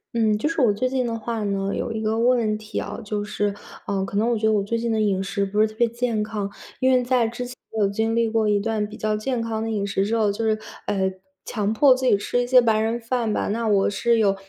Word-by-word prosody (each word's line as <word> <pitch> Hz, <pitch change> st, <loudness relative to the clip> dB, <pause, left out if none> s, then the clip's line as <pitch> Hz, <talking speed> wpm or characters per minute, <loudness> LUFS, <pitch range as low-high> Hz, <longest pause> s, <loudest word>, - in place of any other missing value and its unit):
嗯， 220 Hz, -2 st, +2 dB
就 260 Hz, +9 st, -1 dB
是 330 Hz, -, -2 dB
我 235 Hz, -6 st, +4 dB
最 255 Hz, +5 st, -1 dB
近 255 Hz, -1 st, 0 dB
的 230 Hz, -1 st, -2 dB
话 225 Hz, 0 st, -3 dB
呢， 195 Hz, 0 st, -1 dB
有 230 Hz, -, -3 dB
一 220 Hz, -, -3 dB
个 220 Hz, +1 st, 0 dB
问 230 Hz, -3 st, +2 dB
题 215 Hz, 0 st, -8 dB
啊， -, -, -4 dB
就 210 Hz, 0 st, -3 dB
是， 205 Hz, -1 st, -2 dB, 0.3 s
呃， 195 Hz, -1 st, 0 dB
可 200 Hz, +1 st, -4 dB
能 225 Hz, +3 st, +2 dB
我 235 Hz, -, +1 dB
觉 220 Hz, -, -1 dB
得 220 Hz, -, +4 dB
我 210 Hz, -2 st, +2 dB
最 205 Hz, +4 st, -2 dB
近 230 Hz, 0 st, -1 dB
的 220 Hz, -, +1 dB
饮 195 Hz, -3 st, +1 dB
食 200 Hz, +1 st, -1 dB
不 205 Hz, +2 st, 0 dB
是 -, -, +6 dB
特 215 Hz, -, -12 dB
别 235 Hz, +1 st, +3 dB
健 235 Hz, -1 st, -1 dB
康， 210 Hz, -2 st, -3 dB, 0.3 s
因 260 Hz, 0 st, +4 dB
为 255 Hz, -1 st, +4 dB
在 245 Hz, -1 st, +2 dB
之 240 Hz, +2 st, -5 dB
前 250 Hz, +1 st, -9 dB, 0.2 s
有 205 Hz, -, +4 dB
经 220 Hz, +3 st, -1 dB
历 230 Hz, 0 st, +2 dB
过 220 Hz, -1 st, +1 dB
一 205 Hz, -1 st, +3 dB
段 215 Hz, 0 st, -1 dB
比 210 Hz, +1 st, -9 dB
较 215 Hz, 0 st, 0 dB
健 235 Hz, +3 st, -2 dB
康 225 Hz, -1 st, -2 dB
的 225 Hz, -, -2 dB
饮 200 Hz, -2 st, -1 dB
食 195 Hz, 0 st, 0 dB
之 225 Hz, +3 st, 0 dB
后 215 Hz, -2 st, +2 dB
就 205 Hz, +3 st, -2 dB
是 215 Hz, -1 st, +1 dB, 0.3 s
呃， 190 Hz, -2 st, +1 dB, 0.4 s
强 210 Hz, -2 st, -1 dB
迫 260 Hz, +4 st, +5 dB
自 260 Hz, 0 st, -3 dB
己 225 Hz, -, +4 dB
吃 245 Hz, +4 st, -1 dB
一 -, -, -2 dB
些 250 Hz, +1 st, +6 dB
白 225 Hz, -3 st, +3 dB
人 225 Hz, +2 st, 0 dB
饭 230 Hz, -1 st, -1 dB
吧， -, -, -1 dB
那 225 Hz, +2 st, -1 dB
我 200 Hz, -2 st, +3 dB
是 235 Hz, +3 st, +1 dB
有 200 Hz, -3 st, +3 dB
220 Hz, 300 characters per minute, -23 LUFS, 205-235 Hz, 0.4 s, 是